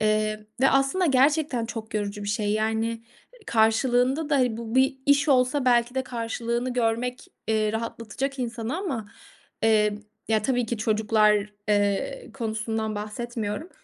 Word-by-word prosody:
eee, 215 0 0
ve 270 - +5
aslında 275 +7 +2
gerçekten 275 -2 +2
çok 220 -1 -7
yorucu 205 -1 -2
bir 205 - -4
şey. 205 0 0
Yani, 220 +1 -1 0.4
karşılığında 245 +6 +2
da, - - +3
hani, 250 -4 +2
bu 230 0 -6
bir 265 +1 +3
iş 285 +2 +4
olsa 255 +1 +3
belki 240 -1 +3
de 265 - 0
karşılığını 235 0 -3
görmek, 245 +1 -1 0.2
eee, 215 -1 +1
rahatlatacak 230 +4 -4
insanı 240 +2 -3
ama, 265 - -4 0.5
eee, 215 -2 +3 0.3
ya, 220 -1 +2
tabii 245 0 0
ki, 235 0 -3
çocuklar, 215 -1 +2 0.2
eee, 205 - 0
konusundan 220 -2 -2
bahsetmiyorum. 215 - -4
230 Hz, 140 wpm, -25 LUFS, 215-255 Hz, 0.5 s, ve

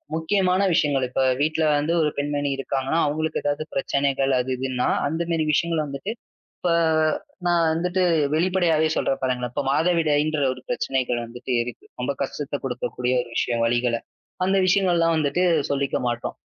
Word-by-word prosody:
முக்கியமான 185 +3 +1
விஷயங்கள். 140 -4 +2
இப்ப 130 - -1 0.2
வீட்ல 155 +2 +1
வந்து 150 +3 0
ஒரு 155 - +2
பெண்மணி 145 0 -1
இருக்காங்கன்னா, 135 +3 -1
அவங்களுக்கு 155 +2 -1
ஏதாவது 145 +1 -1
பிரச்சனைகள் 135 0 0
அது, 125 +1 -2
இதுன்னா 130 -1 -1 0.2
அந்த 160 +3 -2
மாரி 160 -1 +1
விஷயங்கள் 165 0 +1
வந்துட்டு, 140 +10 -5 0.5
இப்ப 175 - +1 0.7
நான் 175 -1 +3
வந்துட்டு 180 +3 0 0.3
வெளிப்படையாவே 170 -2 +2
சொல்றேன் 135 - 0
பாருங்களேன். 125 -2 -1
இப்ப - - -1
மாதவிடாய்ன்ற 155 -1 +2
ஒரு 130 - -13
பிரச்சனைகள் 135 - -1
வந்துட்டு 120 +2 -5
இருக்கு. 120 0 -9 0.2
ரொம்ப 125 - 0
கஷ்டத்த 145 +1 -3
குடுக்கக்கூடிய 125 0 -2
ஒரு 120 - -10
விஷயம், 120 -1 0
வலிகளை. 120 0 +1 0.5
அந்த 195 +1 +2
விஷயங்கள்லாம் 175 -3 +3
வந்துட்டு 155 +4 +1 0.3
சொல்லிக்க 140 -1 0
மாட்டோம். 120 0 -3
145 Hz, 145 wpm, -23 LUFS, 130-165 Hz, 0.7 s, நான்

